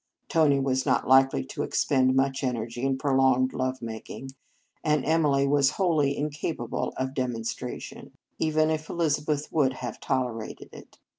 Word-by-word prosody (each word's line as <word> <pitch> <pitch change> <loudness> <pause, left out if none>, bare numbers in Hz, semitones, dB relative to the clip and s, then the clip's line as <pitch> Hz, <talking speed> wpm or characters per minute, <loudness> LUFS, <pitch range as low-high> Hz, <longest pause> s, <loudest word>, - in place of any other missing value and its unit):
Tony 150 -4 +3
was 130 -1 0
not - - +1
likely 135 - +5
to - - -5
expend 130 -1 +2
much 135 0 +1
energy 120 -1 -3
in 135 0 0
prolonged 130 -2 +2
love 130 -1 -2
making, 115 +4 -7 0.5
and 150 -2 +1
Emily 145 -3 +2
was 140 -2 +3
wholly 155 -7 +2
incapable 145 -4 -3
of 130 0 -2
de 130 -2 0
monstration, 120 +1 -6 0.3
even 155 0 +2
if 155 0 -3
Elizabeth 150 -3 -1
would 140 -5 +3
have 120 -3 -6
tolerated 120 -4 -3
it. - - -14
135 Hz, 145 wpm, -27 LUFS, 130-150 Hz, 0.5 s, likely